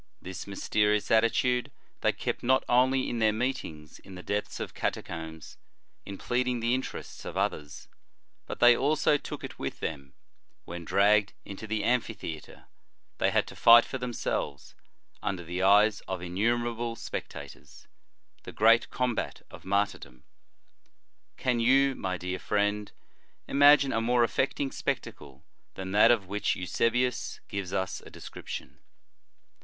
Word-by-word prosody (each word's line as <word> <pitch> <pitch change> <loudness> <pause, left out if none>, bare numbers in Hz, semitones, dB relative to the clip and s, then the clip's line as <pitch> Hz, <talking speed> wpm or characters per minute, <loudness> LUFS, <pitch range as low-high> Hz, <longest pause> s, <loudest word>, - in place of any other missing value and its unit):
This 95 +1 -8
mysterious 105 +1 0
attitude 120 +2 +2 0.3
they - - +2
kept - - -4
not 130 +2 +3
only 130 +2 +3
in 120 - -3
their 110 -1 +4
meetings 105 - -4
in 95 - -13
the 90 - -9
depths 105 +1 -3
of - - -5
catacombs, 80 -1 -5 0.5
in 100 -1 -6
pleading 125 +2 -1
the 115 +1 +1
interests 130 +1 -5
of - - -6
others, 75 -1 -3 0.6
but - - -6
they 120 0 +7
also 150 +3 +2
took - - -8
it - - -8
with - - -4
them, 70 -4 -5 0.5
when, 85 0 -7
dragged 100 +2 +3
into 100 +2 -8
the 110 -1 -1
amphitheatre, 110 -10 -3 0.5
they - - +3
had - - +2
to - - -11
fight 120 0 +8
for 130 - -5
themselves, 120 - -3 0.5
under 95 -3 -3
the 90 +2 -4
eyes 100 +2 +5
of 95 -1 -3
innumerable 115 +6 -1
spectators, 115 - -8 0.5
the - - -9
great 115 +2 +4
combat 125 -3 -2
of - - -12
martyrdom. 100 -11 -2 1.1
Can 125 -2 0
you, 135 +3 +4
my 95 -6 -3
dear 90 +1 -4
friend, 105 0 -1 0.6
imagine 145 -1 +5
a 115 - +1
more 120 +1 +3
affecting 135 +3 0
spectacle 70 -2 -5 0.3
than 95 0 -6
that 105 +2 +6
of 115 -5 +3
which 105 +2 -1
Eusebius 115 +7 -1
gives 100 -3 -4
us 95 0 -2
a - - -12
description - - -9
105 Hz, 140 wpm, -28 LUFS, 95-120 Hz, 1.1 s, fight